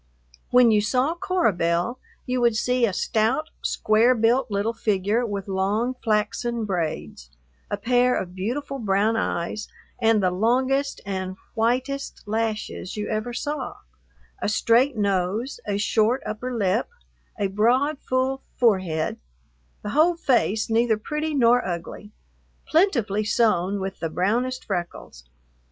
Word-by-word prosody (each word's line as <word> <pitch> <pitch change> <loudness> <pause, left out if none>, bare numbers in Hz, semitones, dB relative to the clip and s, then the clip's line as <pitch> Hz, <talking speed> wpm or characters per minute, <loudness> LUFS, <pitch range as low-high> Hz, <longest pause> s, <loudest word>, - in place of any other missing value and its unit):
When 245 -2 +6
you 210 -1 +4
saw 255 +8 +1
Cora 365 - +1
Belle 175 +8 0 0.3
you 250 0 -1
would 235 -2 +3
see 250 +2 +2
a - - -1
stout, 225 - 0
square 225 +4 +3
built 235 +3 +2
little 205 +3 -1
figure 210 +2 0
with 200 -2 -4
long 200 +6 0
flaxen 225 +2 0
braids, 165 - -4 0.4
a - - -2
pair 250 +1 +2
of 180 -1 -4
beautiful 255 +9 -3
brown 210 +1 +1
eyes 210 0 -2 0.3
and 225 -2 +3
the 185 - +3
longest 260 +8 +1
and 190 -1 -4 0.2
whitest 255 +4 -1
lashes 220 -2 -3
you 210 - -3
ever 215 +2 -2
saw, 270 +1 -4 0.7
a - - 0
straight 235 +4 +3
nose, 200 +5 -1
a 200 -1 0
short 220 +4 +1
upper 250 +4 -4
lip, 215 -1 0 0.5
a 205 - +1
broad, 245 +9 +2
full 260 +1 -1 0.2
forehead, 185 -9 +1 0.6
the 210 - -4
whole 320 +7 +4
face, 240 - +1
neither 225 0 +2
pretty 300 +7 -3
nor 245 -1 +4
ugly, 180 +4 -6 0.5
plentifully 240 - +2
sown 205 -3 +1
with 190 0 -5
the 165 - -2
brownest 240 +10 -1
freckles. 175 - -5
225 Hz, 135 wpm, -24 LUFS, 200-250 Hz, 0.7 s, When